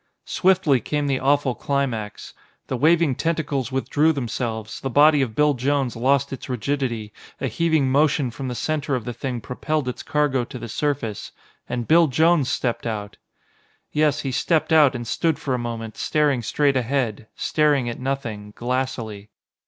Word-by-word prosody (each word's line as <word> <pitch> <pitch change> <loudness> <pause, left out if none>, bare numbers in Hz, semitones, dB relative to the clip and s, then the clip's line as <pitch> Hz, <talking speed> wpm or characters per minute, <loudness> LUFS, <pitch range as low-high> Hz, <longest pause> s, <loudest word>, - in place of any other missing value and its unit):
Swiftly 180 -8 +3
came 150 +5 -1
the 135 -2 0
awful 140 -1 +2
climax. 120 -7 -3 0.3
The - - -3
waving 160 +2 +3
tentacles 145 -4 -1
withdrew 145 +4 +2
themselves, 115 -4 -4
the 135 - -3
body 145 +2 +5
of 115 -5 -2
Bill 150 0 +4
Jones 135 0 0
lost 140 +4 +1
its 135 - -8
rigidity, 120 -4 -2 0.3
a - - -2
heaving 160 -5 +1
motion 145 -2 +2
from 130 +3 -6
the 125 - -4
center 150 0 -1
of 120 -4 -4
the 120 - -4
Thing 120 0 -4
propelled 140 +5 -2
its 125 - -4
cargo 145 -4 +1
to 125 - -8
the 120 - -7
surface 125 -5 -2 0.4
and 120 -1 -3
Bill 165 +1 +6
Jones 155 0 +3
stepped 120 -2 -1
out! 105 -2 -5 0.7
Yes, 150 -1 +2
he 135 - -3
stepped 160 +5 +1
out 150 -5 +6
and 120 0 -4
stood 160 +6 0
for 135 - -3
a 125 - 0
moment 115 -2 -5
staring 150 -5 +1
straight 140 +4 +1
ahead, 120 -4 -1
staring 150 -5 +1
at 120 - -4
nothing, 115 -6 -4
glassily. 120 -4 -3
135 Hz, 165 wpm, -23 LUFS, 120-150 Hz, 0.7 s, Bill